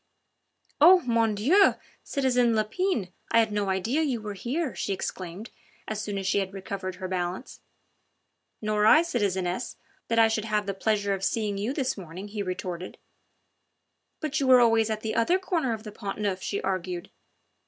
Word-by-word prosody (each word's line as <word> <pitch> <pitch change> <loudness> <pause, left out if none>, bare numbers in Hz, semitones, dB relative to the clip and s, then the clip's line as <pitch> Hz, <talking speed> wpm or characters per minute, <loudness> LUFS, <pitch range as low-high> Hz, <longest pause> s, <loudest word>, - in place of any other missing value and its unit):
"Oh, 355 +5 +8
mon 230 -5 +1
Dieu! 340 - +4 0.3
citizen 250 -4 +2
Lepine, 220 - 0 0.2
I - - +4
had 225 -2 +4
no 205 -1 -1
idea 210 - 0
you 270 -7 0
were 210 -1 -6
here," 260 - -2
she 200 - -2
exclaimed 185 +3 -6 0.4
as 215 -1 -3
soon 205 -2 -4
as 195 - -4
she 200 - +2
had 195 0 -4
recovered 190 -1 -5
her 185 0 -5
balance. 180 +5 -4 1.0
"Nor 210 0 +2
I, 315 +8 +7
citizeness, 190 - -1 0.3
that 230 - 0
I 225 -1 +7
should 220 -1 -1
have 210 -1 0
the 195 - -2
pleasure 205 0 0
of 195 -1 -4
seeing 205 -2 -1
you 215 +5 -1
this 265 -6 -2
morning," 185 +3 -8
he 210 0 -4
retorted. 185 -1 -5 1.2
"But 310 0 -2
you 275 - 0
were 255 -1 +8
always 225 -2 +4
at 215 -1 -2
the 220 0 -3
other 285 +11 +3
corner 340 -9 -1
of 220 -1 -4
the 210 - -8
Pont 200 -1 -6
Neuf," 195 -3 -1
she 200 - -2
argued. 185 -1 -3
215 Hz, 175 wpm, -27 LUFS, 195-245 Hz, 1.2 s, Oh